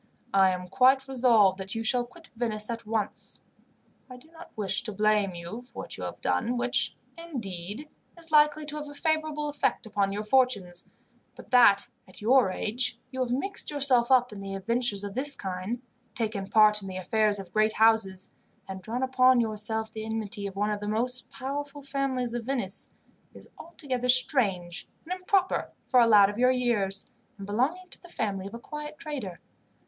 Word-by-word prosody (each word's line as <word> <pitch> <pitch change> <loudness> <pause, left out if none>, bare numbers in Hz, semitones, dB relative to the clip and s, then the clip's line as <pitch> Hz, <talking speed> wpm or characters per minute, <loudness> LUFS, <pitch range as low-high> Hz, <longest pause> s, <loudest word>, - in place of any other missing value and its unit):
"I 195 -1 +5
am 180 0 -3
quite 265 +3 +3
resolved 230 -7 +4
that 195 +3 -6
you 225 - -2
shall 245 +2 +2
quit 330 +7 -17
Venice 220 -2 -2
at 230 -1 -6
once. 215 -2 -3 0.7
I 250 - -10
do 315 +6 -19
not 330 - -13
wish 205 -3 0
to 220 - -4
blame 210 -2 +1
you 175 +7 -7
for 250 - -9
what - - -6
you - - -8
have - - -7
done, 240 +2 0
which, 245 0 0 0.2
indeed, 225 - -6 0.3
is 330 -1 -8
likely 300 0 +4
to 300 0 -5
have 300 -1 -6
a 290 - -10
favourable 310 -1 -1
effect 290 -4 -1
upon 200 -2 0
your 205 +2 -3
fortunes; 210 -7 +1 0.5
but - - -14
that, 205 -6 +6 0.2
at 185 - -13
your 240 0 +4
age, 230 +6 -2
you 260 - -6
have 250 -2 -1
mixed 390 +11 -3
yourself 265 -5 +3
up 250 -3 +4
in 195 -1 -8
adventures 200 +2 0
of 200 -1 -5
this 280 +4 +3
kind, 190 +6 -5 0.3
taken 215 -4 -1
part 210 0 +5
in 195 - -8
the 185 -1 -6
affairs 210 +3 +1
of 190 -3 -9
great 215 0 +2
houses, 215 -4 +2 0.4
and 190 -1 -7
drawn 235 +6 -3
upon 255 -1 +4
yourself 220 0 -1
the 220 0 -6
enmity 220 -2 -1
of 195 - -9
one 205 +1 0
of 210 - -2
the 205 - -5
most 245 +4 -1
powerful 285 +2 -6
families 270 -3 -2
of 240 -1 -3
Venice, 235 -8 -1 0.5
is - - -12
altogether 265 -7 -5
strange 200 - +2 0.2
and 355 - -3
improper 375 +1 0 0.2
for 255 - +4
a 235 - +6
lad 205 -3 +7
of 205 +3 -5
your 250 +1 +5
years, 230 -7 0 0.3
and 200 - -8
belonging 270 - -1
to - - -11
the 350 - -14
family 195 - -3
of 205 - -9
a - - -7
quiet 300 +3 -8
trader. 260 - -6
230 Hz, 185 wpm, -27 LUFS, 205-265 Hz, 0.7 s, lad